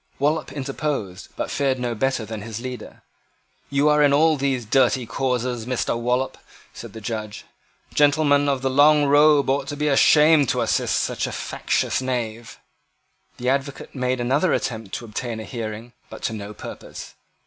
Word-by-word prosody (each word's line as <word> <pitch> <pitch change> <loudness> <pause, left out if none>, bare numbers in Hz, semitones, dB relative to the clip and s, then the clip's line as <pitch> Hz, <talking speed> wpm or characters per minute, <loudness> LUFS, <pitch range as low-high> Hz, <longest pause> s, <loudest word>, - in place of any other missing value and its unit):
Wallop 150 +3 0
interposed, 135 -8 -4
but - - -4
fared 135 -2 0
no 120 -1 -2
better 125 0 -1
than 110 -1 -6
his 110 0 -6
leader. 125 0 -8 0.7
"You 140 +1 +2
are 150 0 +4
in 145 -1 +4
all 155 +2 +4
these 135 -4 -1
dirty 125 +1 +2
causes, 125 -1 -2
Mr. 125 -2 -1
Wallop," 125 +3 -1 0.3
said - - -10
the 110 - -9
Judge. 110 -1 -5 0.5
"Gentlemen 145 -1 +3
of 135 -2 -1
the 135 - +1
long 145 +2 +5
robe 145 0 +5
ought 135 0 -1
to 145 - -5
be 150 +1 0
ashamed 150 0 +5
to - - +1
assist - - +1
such - - -2
factious - - -1
knaves." 120 -3 -4 0.8
The 125 +1 -1
advocate 135 +1 -2
made 125 -1 -1
another 135 +8 +1
attempt 110 -5 -3
to 120 - -6
obtain 115 +1 -5
a - - -6
hearing, 115 0 -6 0.2
but - - -11
to 115 - -1
no 105 -1 -7
purpose. - - -9
130 Hz, 165 wpm, -22 LUFS, 115-145 Hz, 0.8 s, long